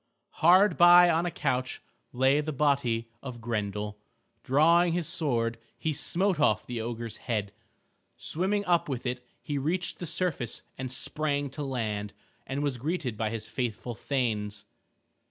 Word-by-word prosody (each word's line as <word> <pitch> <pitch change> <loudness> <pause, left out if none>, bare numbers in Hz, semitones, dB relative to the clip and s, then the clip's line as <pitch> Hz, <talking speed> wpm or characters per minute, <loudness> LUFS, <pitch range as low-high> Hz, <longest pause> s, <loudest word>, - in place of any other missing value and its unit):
Hard 180 +2 +5
by 175 0 +8
on 165 +2 +1
a - - 0
couch 130 -5 -2 0.3
lay 135 +3 +3
the 155 +1 -3
body 130 -5 +1
of 125 -3 -7
Grendel. 105 -2 -3 0.4
Drawing 165 +5 +4
his 170 -3 -1
sword 115 -7 0 0.2
he 160 - -1
smote 185 +5 +1
off 110 -7 +2
the 120 -2 -4
ogre's 115 -1 -5
head. 105 -4 -3 0.6
Swimming 200 +5 0
up 175 -4 +2
with 130 -2 -4
it 125 0 -3 0.2
he 145 -1 -2
reached 175 +6 -2
the 175 - -5
surface 155 -9 -2
and 130 -1 -5
sprang 145 +1 0
to 150 - -6
land, 110 -7 -3 0.3
and 140 +2 -2
was 140 -4 -1
greeted 145 -4 -2
by 110 0 -1
his 110 -1 -5
faithful 120 +1 -3
thanes. 105 -4 -2
135 Hz, 150 wpm, -28 LUFS, 115-160 Hz, 0.6 s, by